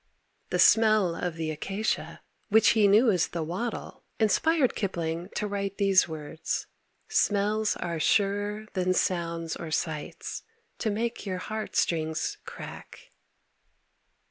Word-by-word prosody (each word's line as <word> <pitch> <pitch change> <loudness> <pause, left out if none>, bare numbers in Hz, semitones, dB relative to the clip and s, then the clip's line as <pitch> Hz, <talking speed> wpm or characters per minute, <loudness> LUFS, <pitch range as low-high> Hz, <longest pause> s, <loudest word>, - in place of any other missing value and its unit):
The - - 0
smell 215 -5 +5
of 175 -1 -3
the 160 -1 -2
acacia, 195 +8 -3 0.3
which 220 +1 +6
he 215 -3 +5
knew 220 +4 +5
as 180 -4 +2
the 170 -2 -3
wattle, 190 +9 -5 0.2
inspired 265 +5 +3
Kipling 170 -3 -3
to - - -1
write 200 -1 -3
those 195 -2 +4
words 160 0 -4 0.4
"Smells 210 +1 +1
are 170 -2 -3
surer 205 +4 +1
than 185 -1 +1
sounds 170 -3 -1
or 165 - -6
sights 155 -1 -3 0.4
To 220 - 0
make 225 +1 -2
your 185 -1 -2
heart 215 +4 -5
strings 160 -2 0
crack." - - -10
195 Hz, 125 wpm, -28 LUFS, 170-215 Hz, 0.4 s, which